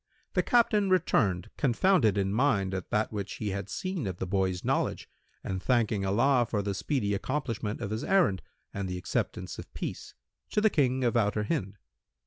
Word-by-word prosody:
The - - +3
Captain 215 -4 +3
returned, 95 - +2
confounded 130 - +3
in 95 0 0
mind 105 -6 +2
at 95 -2 -4
that 105 +1 0
which 100 -1 -4
he 105 -3 -3
had 100 0 -4
seen 185 - -3
of 90 -2 -4
the - - -3
boy's 95 -1 -1
knowledge - - 0 0.4
and 95 -1 -3
thanking 115 -5 +1
Allah 120 +4 +3
for 105 -2 -1
the 100 0 -1
speedy 105 -1 -1
accomplishment 115 -2 -2
of 100 - -3
his 110 +1 -2
errand 175 - +3 0.3
and 100 -1 -3
the 90 - -3
acceptance 90 - -3
of - - -10
peace, - - -6 0.3
to - - +1
the 215 0 +3
King 130 -3 +2
of 120 -1 +1
Outer 105 -2 +2
Hind. 100 - -2
105 Hz, 180 wpm, -29 LUFS, 95-135 Hz, 0.4 s, The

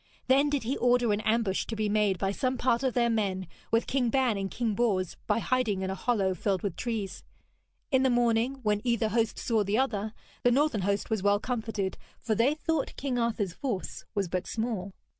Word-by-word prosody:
Then 275 +3 +4
did 285 -3 0
he 250 +5 -1
order 245 -2 +3
an 205 - -1
ambush 215 -3 +1
to 225 - -3
be 215 -1 0
made 205 -2 +2
by 195 +2 0
some 255 +5 -1
part 240 -1 +2
of 260 -3 0
their 240 -1 +3
men, 200 -5 0 0.2
with 230 +1 +2
King 255 -3 +1
Ban 255 -2 +2
and 195 -1 -2
King 230 0 -1
Bors, 195 -5 0
by - - +2
hiding 230 -5 0
in 190 - -1
a - - -1
hollow 195 -2 +1
filled 190 +1 -1
with 200 -5 -2
trees. 220 -5 -4 0.7
In 260 -2 +4
the 265 - +3
morning, 240 +2 +2
when 210 -1 +1
either 235 -3 +1
host 225 0 0
saw 225 -3 +1
the 200 +2 0
other, 220 -5 -1 0.3
the 245 - +4
northern 260 -3 +2
host 200 +3 -1
was 220 -3 +1
well 205 +1 +3
comforted, 220 -5 -3 0.2
for 225 - -1
they 240 +7 +3
thought 315 -2 -1
King 260 -3 -1
Arthur's 220 -6 0
force 230 -7 -4
was 200 -2 0
but 180 +1 -3
small. 220 -4 -3
225 Hz, 210 wpm, -29 LUFS, 200-245 Hz, 0.7 s, Then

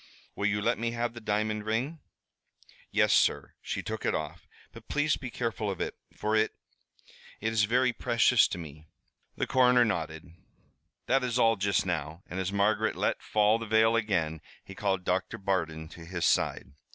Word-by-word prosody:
"Will 100 - 0
you 105 0 0
let 120 +1 +1
me 115 0 -1
have 120 0 -2
the 120 - -9
diamond 105 0 -1
ring?" 125 +9 -2 0.9
"Yes, - - +3
sir." - - +2
She - - -4
took - - -5
it - - +1
off. 80 +2 -5 0.2
"But 115 -1 -14
please 145 +1 +1
be 130 - -7
careful 115 -3 -2
of 95 - -4
it, - - -3 0.2
for 105 +1 -1
it 110 0 +1 0.8
it 110 +1 -1
is 110 -1 +3
very 125 +3 +2
precious 120 0 +4
to - - -5
me." 80 -2 -10 0.5
The - - -1
coroner 125 -1 +4
nodded. 80 -6 -3 0.8
"That 135 +1 +2
is 125 -1 -1
all 115 -2 +4
just 100 -1 +1
now," 80 0 -3
and 90 - -6
as 95 +1 -2
Margaret 100 +2 +1
let - - -1
fall 105 +1 +2
the 115 - -6
veil 110 +1 +4
again, 85 -9 0 0.2
he 95 - -10
called 95 -2 -1
Doctor 90 +1 -1
Bardon 80 -5 -2
to 85 - -11
his 85 0 -3
side. - - +1
105 Hz, 180 wpm, -29 LUFS, 90-115 Hz, 0.9 s, precious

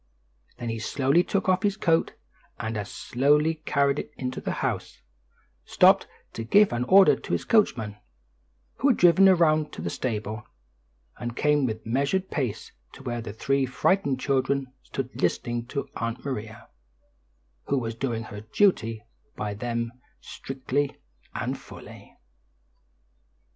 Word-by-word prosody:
Then 120 - -4
he 115 0 -3
slowly 140 +8 +2
took 195 +1 -1
off 185 0 +3
his 200 -1 0
coat, 165 -5 +2 0.5
and 110 0 -3
as 105 -2 -4
slowly 150 +5 +1
carried 140 0 +2
it - - -6
into 130 -1 -4
the - - -2
house, - - -3 0.6
stopped - - +4 0.3
to 115 - -5
give 200 - +4
an 120 +1 -1
order 190 +5 +7
to - - -6
his - - -1
coachman, 115 - +2 0.8
who 275 - +2
had 255 - +4
driven 180 +2 +6
around 155 -4 +3
to - - -7
the - - -2
stable, 110 -3 -3 0.8
and 120 -1 -4
came 150 -1 +2
with 110 -1 -5
measured 140 +11 0
pace 125 -8 -3 0.2
to - - -12
where 120 -1 -3
the 110 - -6
three 135 +5 0
frightened 140 +1 +1
children 135 -1 0
stood 130 -1 -6
listening 120 0 -1
to 140 +2 -4
Aunt 115 +3 -4
Maria, 110 -4 -6 1.0
who 140 - +1
was 115 -3 -2
doing 115 -1 -3
her 105 -2 -8
duty 115 - +1 0.3
by 105 -1 -3
them 115 +2 -3 0.3
strictly 135 +1 -3 0.4
and - - -3
fully. - - -13
130 Hz, 145 wpm, -26 LUFS, 115-150 Hz, 1.0 s, order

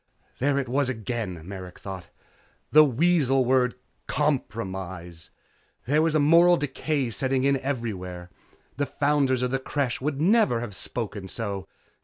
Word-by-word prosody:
There 140 +2 +2
it 135 -2 -1
was 135 +2 +1
again, 110 -8 -4
Merrick 95 -2 -8
thought, 95 -3 -8 0.6
the 155 +1 +8
weasel 135 -2 +3
word 125 -1 +2 0.3
'compromise.' 95 - -3 0.6
There 150 +4 +3
was 160 -1 +1
a - - +4
moral 170 +4 +6
decay 145 -2 -1
setting 130 +2 0
in 140 0 +3
everywhere 95 -10 -4 0.5
the 145 0 0
founders 140 -3 +1
of 125 - 0
the 135 - 0
Creche 130 -2 -2
would 140 0 -2
never 195 - +3
have 115 -3 -5
spoken 105 0 -5
so. 100 -2 -4
130 Hz, 140 wpm, -26 LUFS, 100-145 Hz, 0.6 s, the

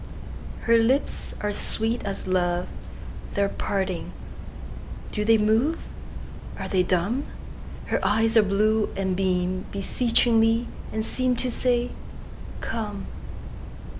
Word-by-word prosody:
Her 230 0 +4
lips 255 +5 0
are 210 0 -1
sweet 225 +3 +1
as 195 -1 -4
love; 180 -1 0 0.7
They 200 - +2
are 200 - +1
parting! 190 -4 -2 1.0
Do 210 - -1
they 225 +1 +5
move? 225 +10 +2 0.8
Are - - -4
they 185 - +2
dumb? 190 +10 0 0.6
Her - - -1
eyes 225 +3 +2
are 225 - +8
blue, 210 +2 +2
and 190 -1 0
beamBeseechingly, 200 +5 +2 0.3
and 220 0 -2
seemTo 255 +1 0
say, 245 0 +1 0.7
"Come!" 210 -3 -4
215 Hz, 105 wpm, -25 LUFS, 195-230 Hz, 1.0 s, are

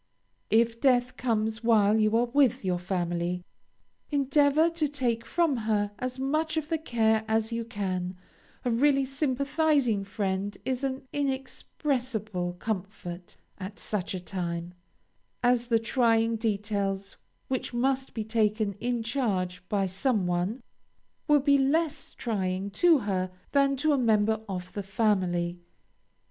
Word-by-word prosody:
If 230 +1 +2
death 250 -2 +3
comes 220 -2 -1
while 220 -2 +4
you 215 +1 +3
are 240 - +3
with 250 -4 +2
your 180 -1 0
friend, 175 -1 -2 0.7
endeavor 290 +3 +3
to 330 -2 0
take 250 -5 -1
from 330 -2 +2
her 215 -2 0
as 255 0 -3
much 310 +5 0
of 305 -1 -2
the 325 -1 0
care 220 -6 +2
as 220 +1 +1
you 230 0 -1
can, 185 -4 -3 0.5
a 245 - +2
really 275 +3 +3
sympathizing 275 -3 +1
friend 195 -1 -2
is 260 0 -1
an 270 0 -2
inexpressible 255 - -2
comfort 180 -2 -5 0.2
at 195 +2 -7
such 200 -3 -3
a - - -3
time, 175 -1 -4 0.7
as 245 -1 +3
the 230 -1 +4
trying 230 -1 +2
details 200 -3 -2 0.3
which 260 -1 -2
must 265 +2 0
be 220 - -2
taken 215 -2 +1
in 240 0 -1
charge 205 -8 -1
by 200 -2 +1
some 195 +2 0
one, 180 +8 -1 0.6
will 295 -2 +5
be 280 0 +4
less 300 +3 0
trying 195 -3 -2
to 335 - +5
her 190 -6 -1 0.2
than 275 -1 +3
to 305 +3 +2
a 280 - +2
member 220 -2 +2
of 180 -1 -5
the 205 - -3
family. 185 -4 0
225 Hz, 135 wpm, -28 LUFS, 195-265 Hz, 0.7 s, will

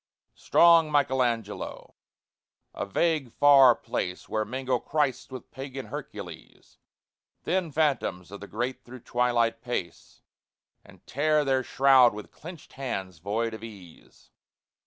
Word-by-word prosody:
Strong 165 -2 +4
MICHELANGELO, 125 -7 -1 0.8
a - - -4
vague 150 - 0
far 135 -3 +6
place 90 0 -5
Where 110 - -1
mingle 130 +2 -2
Christs 145 -2 -1
with 130 -2 -10
pagan 135 0 -7
Hercules; - - -10 0.6
Thin 180 -2 -1
phantoms 135 - -1
of 100 - -8
the 105 - -10
great 120 +5 -4
through 125 0 -12
twilight 120 -1 0
pace, 120 -8 -6 0.6
And - - -19
tear 150 +2 +1
their 135 -1 +2
shroud 130 -3 +4
with 105 - -9
clenched 165 0 -12
hands 95 -10 -5
void 110 +5 -2
of 110 0 -9
ease. 100 -7 -14
125 Hz, 120 wpm, -27 LUFS, 110-140 Hz, 0.8 s, far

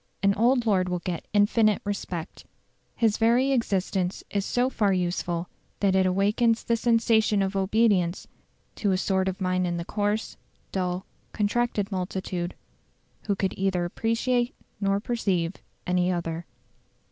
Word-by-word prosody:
An 200 0 +4
old 240 +3 +3
lord 185 -4 +2
will 180 - 0
get 175 -1 -5
infinite 210 +1 +3
respect. 185 -5 -5 0.5
His 225 -3 +2
very 240 +4 +3
existence 195 -6 0
is 200 -1 0
so 245 +1 +2
far 210 -6 +1
useful 175 -1 -1 0.3
that 195 -2 +2
it 190 -1 +4
awakens 210 +5 +2
the 235 - +1
sensation 225 -3 +3
of 195 +1 -2
obedience 195 -3 +2 0.5
to 200 -3 +1
a - - +2
sort 190 0 +1
of 190 +1 -2
mind 185 -1 0
in 175 0 -2
the 170 - -4
coarse, 210 +2 -1 0.3
dull, 180 0 -2 0.3
contracted 210 -1 0
multitude, 185 -1 -3 0.7
who 200 - +2
could 190 -1 -1
neither 190 -2 0
appreciate 240 +6 0 0.2
nor 195 -1 +1
perceive 195 -6 -1 0.3
any 180 0 +1
other. 170 -1 -3
195 Hz, 140 wpm, -26 LUFS, 180-220 Hz, 0.7 s, An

